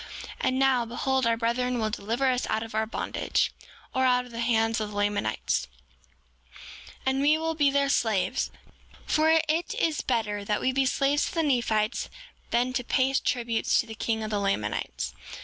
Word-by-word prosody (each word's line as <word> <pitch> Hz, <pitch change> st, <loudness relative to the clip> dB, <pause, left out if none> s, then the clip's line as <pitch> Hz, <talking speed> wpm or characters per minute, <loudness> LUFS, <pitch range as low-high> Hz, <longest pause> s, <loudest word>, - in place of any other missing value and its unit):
And 260 Hz, 0 st, +1 dB
now, 265 Hz, -2 st, +3 dB
behold, 255 Hz, +2 st, 0 dB
our 230 Hz, 0 st, +2 dB
brethren 245 Hz, +2 st, 0 dB
will 220 Hz, -2 st, -1 dB
deliver 230 Hz, +6 st, -1 dB
us 250 Hz, 0 st, -1 dB
out 220 Hz, -, 0 dB
of 225 Hz, 0 st, -9 dB
our 220 Hz, 0 st, 0 dB
bondage, 225 Hz, -, -1 dB, 0.4 s
or 260 Hz, -, +1 dB
out 250 Hz, -1 st, +3 dB
of 250 Hz, -, -13 dB
the 230 Hz, -, -6 dB
hands 225 Hz, -1 st, +2 dB
of 210 Hz, -, -3 dB
the 210 Hz, -, -9 dB
Lamanites, 200 Hz, -, 0 dB, 1.4 s
and 265 Hz, +1 st, +1 dB
we 300 Hz, +2 st, +4 dB
will 325 Hz, 0 st, -1 dB
be 290 Hz, -3 st, +3 dB
their 280 Hz, 0 st, +2 dB
slaves; 220 Hz, -8 st, +1 dB, 0.6 s
for 310 Hz, +1 st, +3 dB, 0.2 s
it 320 Hz, +3 st, 0 dB
is 320 Hz, -2 st, 0 dB
better 215 Hz, -4 st, -1 dB
that 210 Hz, +1 st, 0 dB
we 260 Hz, -, +1 dB
be 265 Hz, 0 st, +2 dB
slaves 280 Hz, +2 st, +2 dB
to -, -, -6 dB
the 330 Hz, -, +2 dB
Nephites 235 Hz, -5 st, +1 dB, 0.4 s
than 245 Hz, +2 st, +1 dB
to 250 Hz, -, -1 dB
pay 265 Hz, +2 st, +1 dB
tribute 235 Hz, -4 st, 0 dB
to -, -, +3 dB
the 225 Hz, -, -8 dB
king 220 Hz, 0 st, -2 dB
of 215 Hz, -, -4 dB
the 205 Hz, -, 0 dB
Lamanites. 105 Hz, -, -2 dB
240 Hz, 185 wpm, -27 LUFS, 220-265 Hz, 1.4 s, we